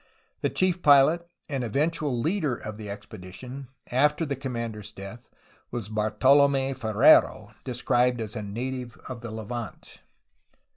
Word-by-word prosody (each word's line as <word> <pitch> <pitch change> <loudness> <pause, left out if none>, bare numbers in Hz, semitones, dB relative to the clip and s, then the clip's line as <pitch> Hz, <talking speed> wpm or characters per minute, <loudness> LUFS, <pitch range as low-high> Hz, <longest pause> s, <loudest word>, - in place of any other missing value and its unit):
The - - +1
chief 185 -1 +1
pilot 155 +4 +5 0.2
and 135 -3 -2
eventual 145 +2 0
leader 155 - 0
of 110 -2 -8
the 105 -2 -7
expedition, 100 +6 -9 0.2
after 150 +5 +2
the 140 -2 -2
commander's 115 -6 -5
death, 100 +5 -10 0.4
was 115 -4 -5
Bartolom^ 135 +6 +3
Ferrelo, 110 -2 +4
described 125 -1 +1
as 110 0 -5
a 110 - -3
native 125 +4 -5
of 125 -3 -7
the 120 - -6
Levant. 110 +1 -7
125 Hz, 130 wpm, -26 LUFS, 110-140 Hz, 0.4 s, pilot